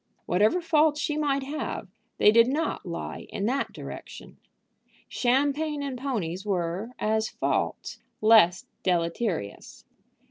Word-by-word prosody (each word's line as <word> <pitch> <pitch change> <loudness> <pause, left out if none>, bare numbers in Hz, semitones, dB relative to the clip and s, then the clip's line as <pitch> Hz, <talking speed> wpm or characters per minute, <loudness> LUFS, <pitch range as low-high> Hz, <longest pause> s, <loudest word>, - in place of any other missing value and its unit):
Whatever 210 - +2
faults 310 -2 +3
she 305 -2 -1
might 280 -2 0
have, 295 +3 -4 0.3
they 210 - +6
did 230 +1 +6
not 295 - -2
lie 170 - -6
in 200 - -3
that 265 +5 0
direction. - - -9 0.7
Champagne 285 +4 0
and 275 -2 -3
ponies 210 -9 -3
were, 185 +1 -2
as 220 +1 0
faults, - - -2 0.2
less 215 -5 +5 0.2
deleterious. 170 - -2
230 Hz, 115 wpm, -27 LUFS, 190-285 Hz, 0.7 s, they